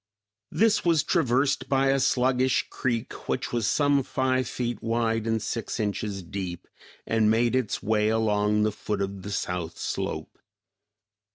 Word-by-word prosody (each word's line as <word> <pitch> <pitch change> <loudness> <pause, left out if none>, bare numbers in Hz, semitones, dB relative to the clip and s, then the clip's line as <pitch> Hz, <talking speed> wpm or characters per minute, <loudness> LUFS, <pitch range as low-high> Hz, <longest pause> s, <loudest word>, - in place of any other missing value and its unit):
This 225 0 +2
was 165 -4 +3
traversed 135 -4 +1
by 135 0 +3
a 135 0 +3
sluggish 130 0 +2
creek 120 -3 -2 0.2
which - - -2
was 115 -4 +1
some 145 +4 +3
five 130 0 0
feet 120 -3 -3
wide 115 -1 0
and 115 0 +1
six 115 +2 -4
inches 100 -2 -2
deep, 90 0 -6 0.4
and 110 -1 +2
made 115 +2 +2
its 130 -5 -1
way 110 0 +2
along 105 -1 +2
the 110 - +2
foot 105 -1 -3
of 100 0 -5
the 100 - -7
south 90 -4 -3
slope. - - -4
115 Hz, 150 wpm, -26 LUFS, 105-130 Hz, 0.4 s, was